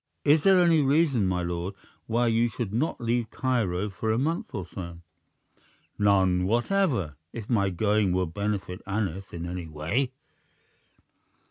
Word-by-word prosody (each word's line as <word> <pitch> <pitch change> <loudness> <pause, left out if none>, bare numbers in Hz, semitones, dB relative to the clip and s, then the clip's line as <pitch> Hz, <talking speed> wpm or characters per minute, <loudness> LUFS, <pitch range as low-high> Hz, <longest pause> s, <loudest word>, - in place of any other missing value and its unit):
Is 150 +1 +5
there 190 +1 +5
any 170 -3 +5
reason, 140 - +3
my 90 -1 0
lord, 85 +3 -3 0.3
why 120 +2 +1
you 115 +1 +2
should 110 -3 -4
not 135 +9 0
leave 120 -1 0
Cairo 105 -7 -1
for 110 +3 -2
a 110 - +1
month 160 +7 -1
or 95 -4 -3
so?" 85 -1 -8 1.0
"None 95 -3 +3
whatever, 120 - +1 0.2
if 115 -3 -6
my 100 -5 +2
going 105 +1 +1
will 90 +1 +1
benefit 100 +1 -3
Aneth 95 -2 -3
in 85 0 -5
any 90 -1 -5
way." 80 - -1
105 Hz, 145 wpm, -27 LUFS, 90-120 Hz, 1.0 s, Is